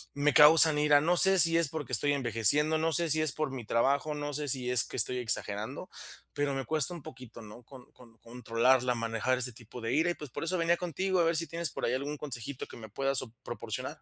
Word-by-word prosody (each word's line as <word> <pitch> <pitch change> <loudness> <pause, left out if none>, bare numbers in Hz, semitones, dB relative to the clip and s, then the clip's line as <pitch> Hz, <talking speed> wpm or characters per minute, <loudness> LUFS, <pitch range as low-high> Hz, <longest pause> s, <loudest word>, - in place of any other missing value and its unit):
me 145 0 +1
causan 150 +1 +6
ira. 150 -1 +4
No 175 +3 +1
sé 190 +1 +4
si 165 0 +5
es 170 -3 +2
porque 145 -4 -7
estoy 145 +6 +1
envejeciendo, 140 +5 +2
no 165 +1 0
sé 170 +1 +2
si 155 0 +3
es 155 -4 +1
por 155 -3 -3
mi 125 -4 -7
trabajo, 140 +5 0
no 145 0 -5
sé 150 +1 -2
si 125 -1 -2
es 125 - +3
que - - -9
estoy 125 +2 +2
exagerando, 115 - -3 0.4
pero 145 -1 -2
me 135 - -4
cuesta 155 +2 +1
un 160 - -11
poquito 125 -3 -12
¿no? 105 +3 -13
Con 125 +1 -15
con 115 -2 -19
controlarla, 125 +2 0
manejar 115 +2 -2
ese 125 -1 -1
tipo 120 +1 -12
de 115 +2 -3
ira 160 +4 +1
y - - -5
pues 150 -4 -11
por - - -6
eso 180 +2 -1
venía 170 +1 +1
contigo, 180 +2 -2
a 170 - +3
ver 165 0 +1
si 165 - 0
tienes 165 +1 -2
por - - -4
ahí 120 - -1
algún 145 +3 -4
consejito 130 -2 -5
que - - -12
me 110 -2 -11
puedas, 135 +4 -1 0.2
proporcionar. 120 +2 -7
140 Hz, 240 wpm, -29 LUFS, 120-155 Hz, 0.4 s, causan